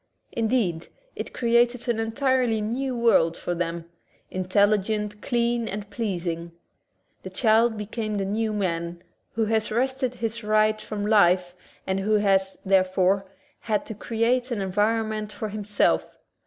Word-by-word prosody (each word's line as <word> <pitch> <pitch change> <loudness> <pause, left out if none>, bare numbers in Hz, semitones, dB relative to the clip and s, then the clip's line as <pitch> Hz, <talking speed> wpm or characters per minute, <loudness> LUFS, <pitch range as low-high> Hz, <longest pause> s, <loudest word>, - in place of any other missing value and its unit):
Indeed, 220 -8 0 0.3
it - - -5
created 240 +1 +2
an 235 -2 0
entirely 245 0 +1
new 245 +4 -2
world 220 -8 +3
for 175 - -3
them 170 -1 -3 0.2
— - - -35
intelligent, 205 +2 +1
clean, 235 -2 0
and 205 +1 -5
pleas 200 -5 -3
ing. 170 0 -4 0.7
The - - -7
child 225 -1 +3
became 215 0 -3
the 195 - -1
new 215 +3 -1
man, 170 -4 -2 0.3
who 225 -1 +1
has 220 0 0
wrested 255 +2 -1
his 230 -1 -4
rights 215 0 +2
from 205 -1 -4
life 180 -4 +4 0.3
and 190 0 -1
who 210 +2 +1
has, 195 -2 +2
therefore, 190 0 +2 0.3
had 215 -3 -1
to - - -6
create 235 +4 0
an 240 -4 -2
environment 215 +2 0
for 215 - -5
himself. 210 0 0
215 Hz, 140 wpm, -25 LUFS, 195-230 Hz, 0.7 s, life